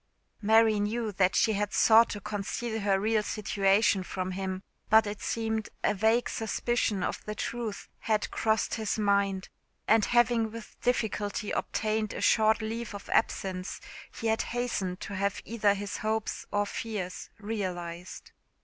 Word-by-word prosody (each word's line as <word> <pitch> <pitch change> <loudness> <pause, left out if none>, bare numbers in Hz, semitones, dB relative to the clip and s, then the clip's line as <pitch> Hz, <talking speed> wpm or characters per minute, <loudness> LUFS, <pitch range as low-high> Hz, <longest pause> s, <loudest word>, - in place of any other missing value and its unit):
Mary 220 0 +5
knew 215 +2 -1
that 190 -1 +2
she 220 - +4
had 205 0 -1
sought 225 +1 +6
to 205 - -4
conceal 215 +3 -3
her 200 -2 +2
real 215 +1 +2
situation 200 -1 +2
from 185 0 -4
him; 190 0 -4 0.3
but 220 0 +6
it 205 0 -5
seemed 220 -1 -2
a - - +3
vague 220 +4 +2
suspicion 225 -3 -1
of - - -3
the 210 - -4
truth 230 -1 -4
had, 215 -2 0
crossed 220 -1 +1
his 220 -1 -1
mind, 200 -2 +1 0.4
and 220 -1 +5
having 240 -2 +3
with 230 -1 -10
difficulty 210 -4 -1
obtained 215 -1 -1
a - - -5
short 220 0 +4
leave 225 0 -4
of 200 - -9
absence 185 -1 0 0.4
he 230 - -6
had 225 0 +2
hastened 220 -7 -2
to - - -6
have 200 0 -1
either 210 -3 +2
his 200 0 -4
hopes 220 0 -2
or 205 0 +1
fears 205 -4 -5
realised. 185 -5 -5
210 Hz, 150 wpm, -29 LUFS, 200-225 Hz, 0.4 s, sought